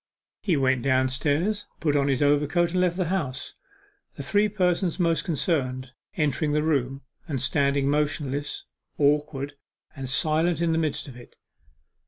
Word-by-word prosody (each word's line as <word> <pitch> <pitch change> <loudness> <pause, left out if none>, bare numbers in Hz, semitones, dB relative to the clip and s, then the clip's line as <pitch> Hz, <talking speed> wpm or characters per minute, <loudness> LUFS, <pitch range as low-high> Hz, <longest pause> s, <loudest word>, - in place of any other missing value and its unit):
He 175 -7 +1
went 130 -2 +2
downstairs, 145 - +1
put 150 -3 +1
on 140 -1 +2
his 135 0 +1
overcoat, 150 +4 +2
and 180 +1 +1
left 180 -1 +1
the 185 - 0
house, 150 -9 -3 0.6
the - - -6
three 205 +8 +2
persons 180 -3 0
most 165 -3 +2
concerned 130 -7 -1 0.3
entering 150 -1 0
the 150 0 +1
room, 135 -3 -1 0.2
and 140 -5 -2
standing 140 +1 +1
motionless, 145 -1 -1 0.3
awkward, 145 -1 +1 0.4
and 135 -2 -5
silent 160 +4 +2
in 170 -1 +1
the 160 - +1
midst 155 -1 -2
of 130 - -10
it. 125 - -14
145 Hz, 150 wpm, -25 LUFS, 135-170 Hz, 0.6 s, went